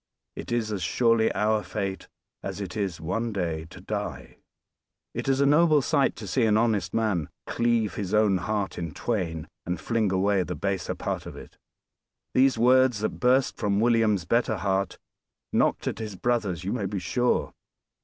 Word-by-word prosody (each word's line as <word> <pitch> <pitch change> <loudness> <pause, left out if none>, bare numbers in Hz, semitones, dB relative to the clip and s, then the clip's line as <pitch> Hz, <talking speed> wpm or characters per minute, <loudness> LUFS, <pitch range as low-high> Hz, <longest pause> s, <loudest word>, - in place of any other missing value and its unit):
It - - -7
is 115 -2 0
as 100 -3 -3
surely 115 0 +2
our 105 0 +1
fate 100 -2 -4 0.3
as - - -5
it 95 -3 -5
is 100 -6 -2
one 115 +8 -2
day 85 -5 -2
to 85 - -13
die. 105 +2 -5 0.8
It - - -3
is 135 0 +2
a 140 - +4
noble 150 0 +5
sight 140 -1 +2
to - - -8
see 130 - +1
an 105 -1 +3
honest 105 -6 +1
man 105 -9 0 0.2
"cleave 115 -4 +1
his 100 -3 -4
own 105 -3 +4
heart 100 +2 -2
in 85 -2 -5
twain, 85 -9 -2 0.2
and 90 +1 -3
fling 110 -4 0
away 95 +1 +2
the - - -3
baser 95 -3 -2
part - - -4
of - - -8
it." - - -12 0.8
These 130 -1 +4
words, 125 -1 +4
that 110 - -2
burst 130 +1 +3
from 100 -1 0
William's 110 -5 +3
better 115 +1 +1
heart, 95 0 -1 0.6
knocked - - +2
at - - -2
his 110 -3 -5
brother's 105 -6 -1
you 95 - -2
may 105 -6 -1
be 100 +1 -4
sure. 120 +7 0
105 Hz, 175 wpm, -26 LUFS, 95-120 Hz, 0.8 s, noble